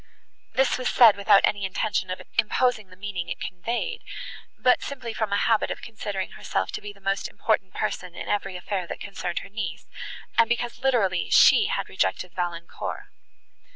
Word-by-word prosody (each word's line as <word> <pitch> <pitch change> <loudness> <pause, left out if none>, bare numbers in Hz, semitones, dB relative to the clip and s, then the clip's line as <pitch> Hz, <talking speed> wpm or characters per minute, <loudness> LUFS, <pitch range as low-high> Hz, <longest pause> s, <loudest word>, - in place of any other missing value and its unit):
This 265 -1 +2
was 255 - 0
said 230 -4 +7
without 200 0 +5
any 205 -1 +2
intention 190 0 -1
of 185 - -4 0.2
imposing 235 -1 +2
the 185 - -14
meaning 190 -2 -4
it - - -4
conveyed, 235 - -3 0.6
but 250 -1 +4
simply 255 -5 -5
from 220 -2 -2
a 200 - +3
habit 225 +1 +2
of - - -5
considering 205 -4 -4
herself - - -2
to - - -5
be 205 - -7
the 200 - -19
most 195 0 -1
important 195 -4 -1
person 180 -1 -3
in - - -6
every 195 -2 -1
affair 180 0 -3
that - - -6
concerned 195 -3 -4
her - - -12
niece, 195 -6 -5 0.5
and 230 0 +6
because 240 0 -1
literally 225 -9 +1
she 420 - +7
had - - -1
rejected 180 -2 -1
Valancourt. 170 -1 -4
205 Hz, 175 wpm, -26 LUFS, 185-235 Hz, 0.6 s, said